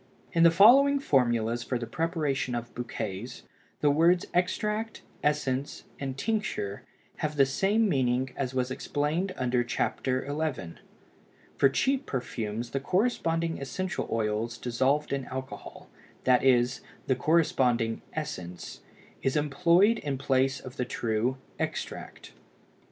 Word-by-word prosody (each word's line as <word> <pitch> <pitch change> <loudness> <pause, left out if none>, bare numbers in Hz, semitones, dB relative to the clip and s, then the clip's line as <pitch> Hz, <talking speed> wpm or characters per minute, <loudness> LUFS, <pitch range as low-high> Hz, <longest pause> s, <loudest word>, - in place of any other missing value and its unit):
In 165 - +3
the 170 - +8
following 260 +11 +6
formulas 120 - +1
for 125 - -2
the 120 - -4
preparation 150 -5 -1
of 120 0 -5
bouquets, 115 -2 -5 0.4
the 145 - +4
words 170 +4 +4
extract, 210 +5 -1 0.2
essence, 140 -2 -1 0.2
and 135 -1 -4
tincture 210 - -2 0.4
have 155 0 -2
the 140 -2 +5
same 200 +10 +2
meaning 130 -5 +1
as 130 -1 -3
was 130 0 0
explained 150 +8 -1
under 125 -1 +1
Chapter 130 +1 -1
XI. 145 - -3 0.7
For 135 - +4
cheap 270 - 0
perfumes 115 -2 -4
the 135 - -1
corresponding 165 - 0
essential 180 +8 -3
oils 110 +1 -1
dissolved 135 +5 0
in 135 -2 -2
alcohol, 130 +1 -8 0.4
that 125 -1 +4
is, 125 -1 +3 0.2
the 130 - +2
corresponding 125 -6 +2
"essence," 90 - -6 0.4
is 135 - 0
employed 170 +9 +3
in 140 -2 -3
place 135 0 +1
of 130 -1 -10
the - - 0
true 115 +3 -1 0.2
"extract." - - -5
135 Hz, 125 wpm, -28 LUFS, 125-165 Hz, 0.7 s, the